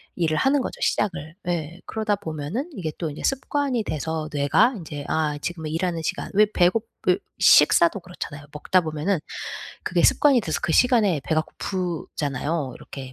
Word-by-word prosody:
일을 160 -3 0
하는 275 +1 +3
거죠 - - -5
시작을. 160 -6 -1
예. 170 0 -2
그러다 215 -2 0
보면은 165 - -4
이게 170 -7 -3
또 165 -3 -2
인제 145 - -8
습관이 270 -3 0
돼서 155 0 -3
뇌가 145 - +3
인제 150 -5 -7
'아 150 -2 0
지금은 160 -2 -4
일하는 165 0 -1
시간' - - -3
왜 210 +1 +7
배고 185 +5 +3 0.2
왜 180 - +5 0.2
식사도 170 +5 +6
그렇잖아요. 145 -5 -8
먹다 180 +5 +2
보면은 155 +3 -1 0.7
그게 - - +1
습관이 280 -4 +5
돼서 160 - -2
그 165 - 0
시간에 215 - +4
배가 155 -1 +2
고프잖아요. 155 -6 -3
이렇게 135 -2 -9
165 Hz, 350 characters per minute, -24 LUFS, 155-205 Hz, 0.7 s, 왜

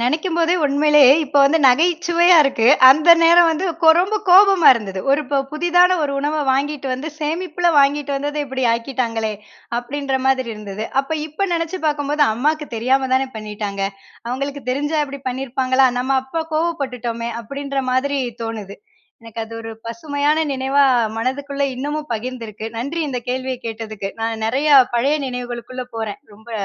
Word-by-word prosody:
நெனைக்கும்போதே 330 +6 0
உண்மையிலேயே 290 -1 +5
இப்போ 285 +1 0
வந்து 315 +4 +3
நகைச்சுவையா 345 +5 +3
இருக்குது. 265 -2 +3 0.2
அந்த 310 +5 +5
நேரம் 340 0 +6
வந்து 325 +4 -2 0.4
ரொம்ப 400 +4 -1
கோபமா 390 -2 +6
இருந்தது 195 -4 -5
ஒரு 280 +2 +3 0.3
புதிதான 355 +3 +3
ஒரு 280 -1 -1
உணவ 295 +2 -2
வாங்கிட்டு 275 +1 -2
வந்து 280 +5 -6
சேமிப்புல 340 +3 -1
வாங்கிட்டு 285 0 +2
வந்த 290 +2 -3
இப்படி 260 -1 -3
ஆக்கிட்டாங்களே? 230 -2 -2 0.5
அப்படின்ற 270 +2 -3
மாதிரி 260 -2 +1
இருந்தது 210 0 -7 0.2
அப்போ. 275 +4 -5
இப்போ 310 +6 -6
நினைச்சு 335 +2 -3
பார்க்கும்போது 295 0 0
அம்மாவுக்கு 300 +6 -1
தெரியாம 260 +3 +1
தானே 265 0 0
பண்ணிவிட்டாங்க. 210 -2 -6 0.5
அவங்களுக்கு 275 +3 -4
தெரிஞ்சா 295 +4 -1
இப்படி 280 -1 -9
பண்ணியிருப்பாங்களா? 260 0 +1
நம்ப 260 +2 -1
அப்போ 320 +5 -4
கோவப்பட்டுட்டோமே, 250 -8 -3
அப்படின்ற 275 +4 -6
மாதிரி 275 +2 0 0.2
தோணுது. 215 -3 -6 0.5
எனக்கு 230 0 -8
அது 225 - -14
ஒரு 225 0 -8 0.2
பசுமையான 290 +3 -1
நினைவா 270 +2 +1 0.4
மனதுக்குள்ள 280 +3 -3
இன்னமும் 295 +3 -5
பகிர்ந்திருக்கு. 225 -2 -7
நன்றி 280 +8 -4
இந்த 250 -2 -3
கேள்விய 260 0 -3
கேட்டதுக்கு 220 -3 -6
நான் 225 -1 -3
நிறைய 275 +6 0 0.3
பழைய 270 +5 +1
நினைவுகளுக்குள்ள 245 0 -6
போறேன். 220 +1 -5
ரொம்ப 220 +3 -16
275 Hz, 140 wpm, -19 LUFS, 240-305 Hz, 0.5 s, நேரம்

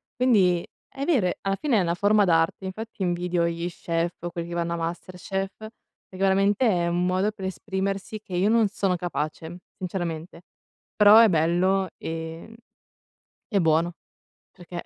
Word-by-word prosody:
quindi 195 -9 +3 0.2
è 275 - -6
vero 270 - +2
e 180 - -2
alla 195 0 0
fine 275 -1 +1
è - - +3
una 170 -1 0
forma 205 +2 +3
d'arte, 165 +2 +1
infatti 215 +3 -7
invidio 175 -1 0
gli 170 +1 -3
chef 170 0 -2
o 175 - -2
quelli 170 -1 -5
che 170 - -7
vanno 170 0 -1
a - - -1
MasterChef, 185 +3 -4
perché 220 -3 -14
veramente 195 +4 +2
è 175 -4 +1
un 175 +1 0
modo 185 +3 +1
per 195 -3 -8
esprimersi 195 +2 -3
che 190 - -12
io 195 +4 +2
non 225 -2 +4
sono 195 -2 -1
capace 165 -1 -4 0.2
sinceramente, 170 -2 -5 0.5
però 210 +1 +8
è 230 -1 +7
bello, 180 +3 +2
ehm, 165 +6 -6 0.9
e 200 -4 +1
buono, 165 +1 +2 0.6
perché 175 -1 -8
185 Hz, 160 wpm, -25 LUFS, 170-200 Hz, 0.9 s, però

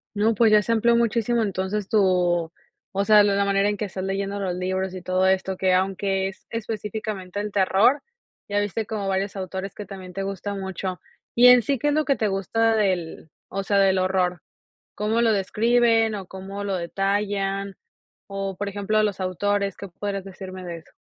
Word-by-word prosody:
No, 215 +2 +2
pues 225 +1 +4
ya 210 0 +6
se 230 - -2
amplió 235 +1 +3
muchísimo 235 0 +1
entonces 195 0 -2
tu, 180 -5 +2 0.4
o 200 0 -1
sea, 210 -1 +7
la 200 -1 +2
la 200 - +2
manera 200 +1 +2
en 205 - -2
que 210 - -2
estás 190 -1 -6
leyendo 195 +1 -2
los 185 -3 -2
libros 185 +1 -2
y 185 - -6
todo 185 +1 +1
esto, 190 0 +1
que 185 -1 +2
aunque 190 +1 0
es 195 - -15
específicamente 210 -3 -4
el 210 0 -3
terror, 205 +8 +3 0.5
ya 205 - +1
viste 205 +2 -2
como 210 -3 -3
varios 195 +1 -1
autores 190 0 -5
que 210 - -7
también 185 -2 -9
te 195 +1 -3
gustan 195 +1 -4
mucho, 190 -1 -4 0.4
¿y 245 +1 +7
en 250 -1 +8
sí 275 +4 0
qué 295 +5 0
es - - +1
lo 310 0 +1
que 275 - +2
te 215 -4 0
gusta 225 +4 +1
del 180 -6 -1 0.2
o 195 +1 -3
sea, 200 +1 +1
del 190 -1 +4
horror? 185 -2 0 0.5
¿Cómo 215 +2 0
lo 230 -1 +4
describen, 225 +2 +2
o 195 -3 -6
cómo 195 +2 -7
lo 195 -1 -1
detallan, 195 +2 -1 0.5
o 195 -1 -4
por 205 +2 -3
ejemplo 205 +2 0
los 205 -2 -1
autores? 200 +2 -1
¿Qué 200 - -8
podrías 195 +2 -4
decirme 185 -1 -9
de 170 -1 -5
eso? 160 - -20
195 Hz, 195 wpm, -24 LUFS, 190-210 Hz, 0.5 s, en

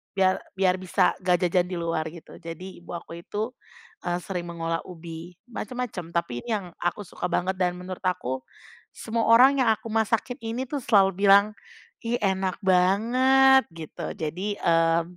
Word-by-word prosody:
biar 190 -1 +3 0.2
biar 185 -1 +2
bisa 185 0 +2
ngga 180 -1 +2
jajan 180 0 +2
di 185 - -5
luar, 165 -2 -1
gitu. 170 - -12
Jadi 170 +3 -8
ibu 175 - -10
aku 170 0 -7
itu, 215 +3 -3 0.6
eee, 175 0 -1
sering 180 -2 -4
mengolah 165 0 -3
ubi, 170 0 -9 0.2
macem-macem 220 -7 -5
tapi 125 -8 -2
ini - - -8
yang 200 -3 -2
aku 175 +4 -2
suka 190 - -6
banget 185 +2 0
dan 180 -1 +1
menurut 185 +1 -8
aku, 130 -8 -1 0.5
semua 225 0 -2
orang 255 +5 +7
yang 245 - +2
aku 220 - -11
masakin 225 +3 0
ini 230 +2 -3
tuh 290 - -3
selalu 200 -6 +4 0.2
bilang, 200 +2 +7 0.5
"ih 230 +1 0
enak 190 -1 0
banget" 250 +9 +4
gitu 165 -2 -7
jadi, 180 +7 -3
eee, 165 0 +3
185 Hz, 160 wpm, -26 LUFS, 170-220 Hz, 0.6 s, orang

